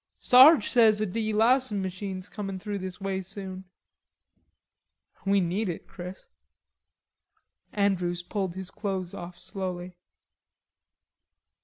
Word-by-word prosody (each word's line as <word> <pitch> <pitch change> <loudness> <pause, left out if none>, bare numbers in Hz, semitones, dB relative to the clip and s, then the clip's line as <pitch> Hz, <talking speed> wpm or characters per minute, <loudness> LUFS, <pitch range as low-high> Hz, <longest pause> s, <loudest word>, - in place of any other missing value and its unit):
"Sarge 260 -1 +7
says 220 -4 +5
a 215 - +1
delousin' 220 +3 +1
machine's 190 0 -5
comin' 195 -3 -5
through 205 +1 -4
this 185 0 -6
way 195 -1 -2
soon." 190 0 -8 1.6
"We 200 0 +4
need 185 +3 -1
it, 170 - -6
Chris." 180 +1 -9 1.4
Andrews 180 -4 0
pulled 190 -2 -3
his 190 0 -7
clothes 190 -3 -4
off 175 -2 -8
slowly. 180 -2 -5
195 Hz, 105 wpm, -27 LUFS, 185-210 Hz, 1.6 s, Sarge